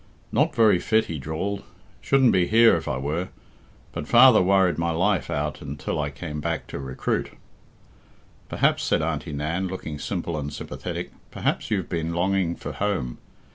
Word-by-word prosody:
"Not - - +2
very 110 -6 +5
fit," 110 +3 +2
he 80 -3 -5
drawled; 85 +8 -3 0.4
"shouldn't 135 -3 +4
be 90 -1 +3
here 115 +1 +6
if - - -4
I 65 -3 -1
were. 75 +7 -2 0.6
But 75 - -5
father 120 -1 +7
worried 95 -2 +3
my 85 0 0
life 90 0 +1
out 75 +1 -2
until 75 +1 -3
I 75 - -2
came 75 +1 -6
back 85 +1 -2
to - - -5
recruit." 65 -1 -2 1.2
"Perhaps," - - +2
said - - +1
Auntie - - -2
Nan, 80 +6 -2
looking 80 -5 -6
simple 80 +2 -3
and 75 0 -4
sympathetic, - - -6 0.2
"perhaps - - -2
you've 95 -5 -1
been 85 -1 -2
longing 90 -1 +1
for - - -6
home. 95 -13 -2
85 Hz, 165 wpm, -24 LUFS, 75-95 Hz, 1.2 s, father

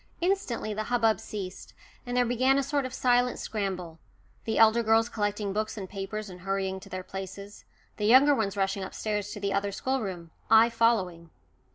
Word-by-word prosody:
Instantly 345 - -1
the 215 +1 -3
hubbub 225 -4 +2
ceased, 195 -3 -7 0.3
and 245 0 -2
there 250 - +4
began 255 +3 +2
a 275 - +2
sort 280 -1 -1
of - - -11
silent 245 0 +2
scramble 185 -6 -4 0.5
the 220 - -1
elder 225 +1 +6
girls 225 +1 +3
collecting 205 -2 -2
books 215 +2 -2
and 195 -2 -5
papers 205 +2 -5
and 180 -2 -10
hurrying 190 0 -2
to - - -14
their 185 0 -5
places; 195 +2 -8 0.3
the 210 - -1
younger 265 +5 +7
ones 205 -7 -1
rushing 195 0 0
upstairs 205 +1 -3
to - - -6
the 200 0 -1
other 200 0 0
schoolroom, 195 -9 -3 0.2
I 225 +1 +6
following. 190 -8 +1
215 Hz, 180 wpm, -28 LUFS, 195-235 Hz, 0.5 s, younger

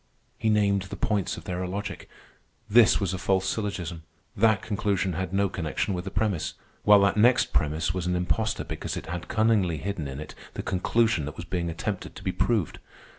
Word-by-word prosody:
He 110 - +1
named 100 -2 +3
the 95 - -7
points 105 -4 -1
of - - -9
their 90 0 -3
illogic. 100 +3 -5 0.6
This 115 0 +6
was 95 -2 -1
a 95 - -3
false 95 0 +1
syllogism, 95 -5 -3 0.3
that 110 -1 +3
conclusion 100 -3 0
had 90 +1 -3
no 100 +1 +2
connection 85 +1 -2
with 90 0 -4
the - - -3
premise, 100 -5 -1 0.3
while 105 -1 +7
that 100 +1 +3
next 120 +3 +4
premise 80 +2 +1
was 90 -1 -2
an 90 - +1
impostor 110 +5 0
because - - -5
it - - -6
had 85 +1 -5
cunningly 110 -7 +2
hidden 85 -2 -3
in 65 +1 -6
it 75 - -8 0.2
the - - -4
conclusion 95 -2 +1
that 75 - -6
was 85 - -6
being 85 0 -2
attempted 90 +4 -4
to - - -10
be - - 0
proved. 110 -9 0
95 Hz, 195 wpm, -27 LUFS, 85-105 Hz, 0.6 s, while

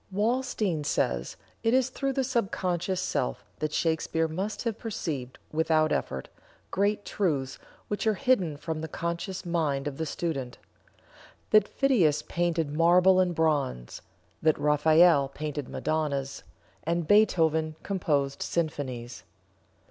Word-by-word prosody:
Walstein 215 - 0
says: - - -1 0.3
"It 230 +2 +2
is 260 0 +2
through 275 +1 -2
the 265 - 0
sub 240 -6 0
conscious 180 0 -1
self 60 - -2
that 155 -1 -1
Shakespeare 160 0 0
must 190 +7 -4
have 230 -3 -2
perceived, 150 - -4
without 155 0 +2
effort, 65 -1 -2 0.4
great 205 +1 0
truths 140 -9 -1 0.3
which 205 +1 -2
are 215 - +3
hidden 195 - +1
from 155 +1 -4
the 160 - -4
conscious 170 +4 -4
mind 155 -5 0
of 140 -2 -5
the 160 - -2
student; 140 -7 -3 0.9
that 215 -1 +6
Phidias 195 - +2
painted 170 -3 -1
marble 180 +4 +5
and 180 -2 +2
bronze; 145 - -1 0.4
that 155 -1 +3
Raphael 150 0 +4
painted 145 -1 -5
Madonnas, 140 -4 -2 0.4
and 170 0 -1
Beethoven 160 -7 +3
composed 145 -8 -1
symphonies." 130 -7 -3
160 Hz, 125 wpm, -28 LUFS, 150-190 Hz, 0.9 s, that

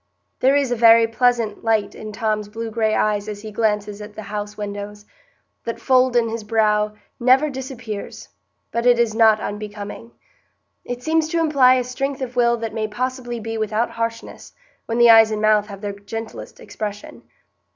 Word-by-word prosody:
There 265 +2 +4
is 280 -3 +1
a - - +2
very 230 0 +6
pleasant 230 -1 0
light 220 -3 +1
in 215 0 -8
Tom's 215 -1 -2
blue 225 +1 -6
gray 220 -1 +1
eyes 210 -1 0
as 210 0 -7
he 215 - -7
glances 210 -1 -1
at 210 0 -10
the 215 - -7
house 210 0 -6
windows; 205 0 -6 0.6
that 230 - -5
fold 255 -1 +3
in 235 -1 +3
his 225 0 -4
brow 210 -1 +1 0.2
never 265 +5 +4
disappears, 250 -6 -7 0.4
but 235 +1 0
it 245 -1 +6
is 235 -2 +1
not 220 -1 +5
unbecoming; 210 +2 -7 0.7
it 245 0 -6
seems 320 0 +1
to 335 +1 -1
imply 280 -6 +5
a 255 - +1
strength 270 +2 -4
of 250 -1 -6
will 235 -1 +3
that 225 -2 -5
may 220 -1 -2
possibly 245 +2 -4
be 225 0 -5
without 220 +2 -1
harshness, 230 0 -5 0.3
when 230 - -2
the 235 -1 +7
eyes 225 -1 +7
and 215 -1 -2
mouth 215 -1 +3
have 200 -2 -10
their 205 -1 -4
gentlest 220 +3 -8
expression. 210 -1 -7
225 Hz, 180 wpm, -21 LUFS, 210-245 Hz, 0.7 s, the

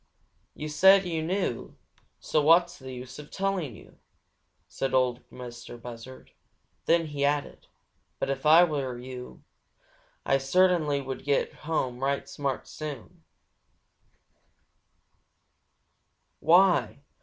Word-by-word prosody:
"Yo' 150 - -6
said 190 +6 +5
you 165 -3 -2
knew, 175 - -3 0.4
so 155 - 0
what's 170 +3 +4
the 130 -1 -9
use 130 +2 -9
of 150 - -11
telling 190 - -2
yo'?" - - -17 0.7
said 135 - -2
Ol' 125 -1 +2
Mistah 120 -1 -10
Buzzard. 120 +2 -11 0.6
Then 165 0 +3
he 145 -2 -4
added: 145 0 -1 0.5
"But - - -2
if 135 -1 -4
Ah 160 +3 +7
was 135 -6 -3
yo', 125 -1 -9 0.8
Ah 135 - +2
cert'nly 155 0 +2
would 135 -1 -6
get 140 0 0
home 135 -6 -3
right 140 +1 -1
smart 140 -2 -4
soon." 155 +3 -8
140 Hz, 110 wpm, -27 LUFS, 130-165 Hz, 0.8 s, Ah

